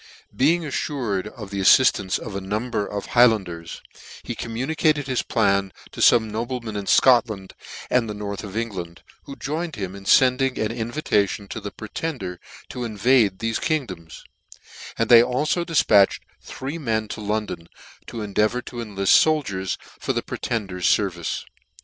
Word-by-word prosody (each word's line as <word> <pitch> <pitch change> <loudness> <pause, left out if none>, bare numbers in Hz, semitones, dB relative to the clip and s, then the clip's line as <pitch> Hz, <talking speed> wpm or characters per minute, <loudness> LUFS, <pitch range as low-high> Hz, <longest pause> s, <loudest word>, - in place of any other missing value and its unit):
Being 165 +5 +2
affured 125 -9 -2
of 105 -6 -10
the 100 - -3
afiiftance 95 -2 +4
of 100 - -8
a 100 - -3
number 105 +2 -2
of 100 -1 -4
the - - -12
Highlanders, 95 -9 +2 0.4
he - - -4
communicated 145 +5 -1
his 130 -2 0
plan 100 -3 +1 0.2
to - - -11
fome 110 -3 +5
noblemen 115 0 -4
in 100 -1 -4
Scotland 115 -7 +3 0.3
and 120 -3 +1
the 105 - -4
north 100 0 -5
of 100 -1 -8
Eng 115 0 -1
land, 85 -3 -8 0.2
who 140 - -8
joined 155 +4 -4
with 100 - -3
him 95 - -9
in 100 0 -11
fending 130 +3 +4
an 110 0 -1
invita 115 -3 0
tion 100 -2 -6
to 110 - -6
the 100 - -5
Pretender 110 - -5 0.3
to 125 - -5
invade 110 -2 +2
thefc 115 +1 -2
kingdoms: 95 - -3 0.7
and 115 - +1
they 115 -1 +9
alfo 140 +8 0
difpatrhed 110 - +4 0.2
three 140 +5 -6
men 110 -6 -1
to 110 - -6
London, 105 -5 -3 0.4
to 115 -2 -5
endeavour 105 +4 0
to 120 - -9
enlift 100 -4 +1
fokliers 100 - +2 0.2
for - - -2
the - - -2
Pretender's 95 -6 -3
fervice. 90 -5 0
110 Hz, 160 wpm, -23 LUFS, 100-125 Hz, 0.7 s, they